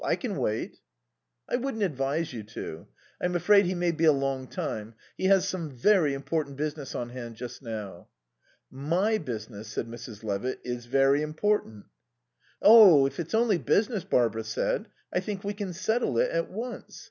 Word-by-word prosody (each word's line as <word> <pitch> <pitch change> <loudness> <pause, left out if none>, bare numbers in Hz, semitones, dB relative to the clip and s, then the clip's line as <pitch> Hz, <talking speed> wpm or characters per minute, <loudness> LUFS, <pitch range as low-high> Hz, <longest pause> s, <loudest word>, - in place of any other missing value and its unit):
I - - +2
can - - -4
wait." - - -2 0.7
"I - - 0
wouldn't 245 -4 -2
advise 145 -2 -1
you 115 - -5
to. 105 -6 -8 0.3
I'm 180 0 0
afraid 200 +3 +5
he 185 - -1
may 175 0 +1
be 165 0 0
a 155 - +8
long 135 -2 -1
time. 110 -1 -5 0.2
He - - -3
has 190 -1 +4
some 180 -5 -3
very 145 - +3
important 140 0 -3
business 150 -2 -4
on 120 - -3
hand 120 -2 -8
just 120 +3 -8
now." 105 -7 -7 0.6
"My 175 +11 0
business," 110 -5 -6
said 110 - -3
Mrs. 115 -2 -9
Levitt, 105 +4 -2
"is 120 -1 -5
very 135 +2 +3
important." 155 - -1 0.8
"Oh, 200 -10 +9
if 135 +3 -3
it's 170 +5 -2
only 225 -5 +3
business," 210 0 +1
Barbara 120 - +1
said, 110 0 -1 0.3
"I - - +2
think 195 +1 -5
we 205 +1 -2
can 200 -2 -5
settle 220 +7 0
it - - +2
at - - -1
once. 240 +2 -7
150 Hz, 170 wpm, -28 LUFS, 120-195 Hz, 0.8 s, Oh